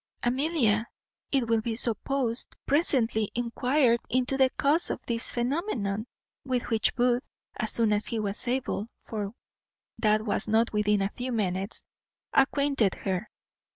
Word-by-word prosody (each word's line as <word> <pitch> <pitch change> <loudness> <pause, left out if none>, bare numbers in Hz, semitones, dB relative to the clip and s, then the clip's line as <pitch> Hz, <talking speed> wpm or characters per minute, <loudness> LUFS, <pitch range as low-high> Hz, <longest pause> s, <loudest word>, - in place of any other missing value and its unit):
Amelia, 240 -4 +1 0.4
it 265 -4 +1
will 225 -1 +2
be 225 0 -2
supposed, 235 +1 -1
presently 240 -8 +2
enquired 245 +1 +2
into 255 +1 +1
the 265 -1 +4
cause 300 +5 +3
of - - -2
this 230 0 +1
phenomenon, 240 - -2 0.4
with 255 -2 -1
which 220 -1 +2
Booth, 245 0 +2 0.4
as 215 - -1
soon 225 -2 +3
as 210 +1 +1
he 230 - -2
was 210 +2 -1
able 245 -4 -1 0.2
(for 210 -1 -5 0.6
that 215 0 +2
was 205 -1 +1
not 225 +2 +2
within 210 -1 +2
a 195 - -1
few 250 +1 -3
minutes), 195 -2 -2 0.5
acquainted 275 -6 +2
her. 190 +2 -3
235 Hz, 140 wpm, -28 LUFS, 215-260 Hz, 0.6 s, the